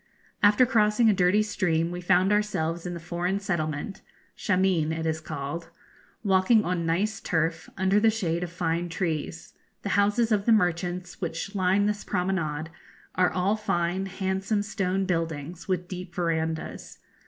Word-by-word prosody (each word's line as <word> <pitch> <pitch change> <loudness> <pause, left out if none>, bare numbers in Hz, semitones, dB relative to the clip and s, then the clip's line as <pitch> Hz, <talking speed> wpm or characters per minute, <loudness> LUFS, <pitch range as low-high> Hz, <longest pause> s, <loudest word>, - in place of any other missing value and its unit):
After 210 +5 +6
crossing 220 -2 +4
a - - +3
dirty 190 +3 +3
stream 175 -5 0
we 175 0 -5
found 180 +2 +3
ourselves 175 -5 0
in 175 - -4
the - - -6
foreign 175 +3 -2
settlement 170 -1 -3 0.3
Shameen 185 -5 +1
it 160 0 -3
is 160 0 -1
called 155 +2 -5 0.5
walking 200 +2 +4
on 175 -2 -1
nice 195 +6 0
turf, 165 0 -1
under 190 +2 +3
the 225 +1 +5
shade 175 -6 -1
of 175 - -5
fine 170 0 -1
trees. 160 -2 -3 0.3
The 200 - -2
houses 210 +4 +2
of 205 0 +1
the - - +6
merchants 175 -2 0
which 175 +3 -4
line 190 +1 +2
this 210 0 -1
promenade 160 -4 -2 0.4
are 185 -1 +3
all 190 +3 +1
fine, 185 -2 -1
handsome 195 +2 -1
stone 195 -2 -1
buildings, 165 -2 -3
with 180 -2 -1
deep 180 -1 -7
verandahs. 160 -2 -2
180 Hz, 155 wpm, -27 LUFS, 165-200 Hz, 0.5 s, After